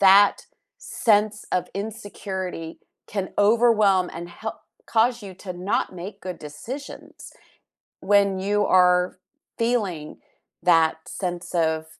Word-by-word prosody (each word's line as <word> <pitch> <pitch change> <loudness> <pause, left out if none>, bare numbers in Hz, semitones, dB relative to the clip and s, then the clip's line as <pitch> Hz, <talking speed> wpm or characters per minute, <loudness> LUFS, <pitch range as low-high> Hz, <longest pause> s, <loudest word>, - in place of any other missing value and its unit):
that 200 +1 +6 0.4
sense 210 -1 +1
of 180 - 0
insecurity 195 -5 -5 0.3
can 195 -2 -3
overwhelm 210 -4 +4
and 170 +1 -7
hel 220 +6 -7 0.3
cause 235 0 +2
you 195 - -8
to 185 0 -8
not 185 +1 -1
make 190 +3 -8
good 180 -1 -6
decisions 230 - -9 0.7
when 200 -1 +3
you 205 +2 +1
are 180 -1 +4 0.4
feeling 205 -10 -1 0.5
that 165 -2 +4
sense 175 -2 -5
of, 160 -2 +1
195 Hz, 110 wpm, -24 LUFS, 180-210 Hz, 0.7 s, that